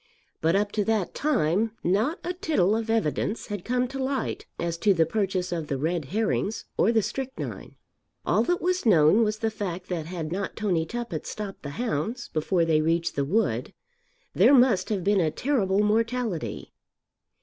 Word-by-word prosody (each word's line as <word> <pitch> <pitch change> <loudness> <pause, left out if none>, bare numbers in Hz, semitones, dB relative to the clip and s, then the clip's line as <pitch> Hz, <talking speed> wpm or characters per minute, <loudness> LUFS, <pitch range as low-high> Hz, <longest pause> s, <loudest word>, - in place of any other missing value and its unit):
But 165 +3 +2
up 205 +1 +1
to 210 - 0
that 220 -5 0
time 215 - +1
not 215 - +1
a 355 - -2
tittle 220 - +1
of 225 0 -3
evidence 220 0 0
had 205 -4 -5
come 250 +1 0
to 270 0 -6
light 265 -2 -2
as 170 -1 -2
to 200 +1 +3
the 165 -1 +4
purchase 190 -1 -1
of 165 -3 -3
the 140 - -2
red 160 +2 -1
herrings 210 +4 -1
or 225 - +3
the 225 -2 +2
strychnine. 260 +5 -5 0.5
All - - +3
that 355 -1 0
was 365 +1 +1
known 195 0 +5
was 215 0 0
the 225 0 -1
fact 185 -4 -5
that 165 -4 -3
had 165 -3 -5
not 195 +2 -3
Tony 180 -7 0
Tuppett 235 -9 -5
stopped 205 -2 -6
the 145 - -6
hounds 235 - -2
before 165 +2 +1
they 155 -2 +3
reached 165 +2 0
the 140 - +1
wood, 215 +10 0 0.6
there 285 - +6
must 240 -8 +4
have 200 -4 -1
been 200 0 +3
a 160 - +2
terrible 205 - +1
mortality. 215 - -1
205 Hz, 180 wpm, -26 LUFS, 170-230 Hz, 0.6 s, there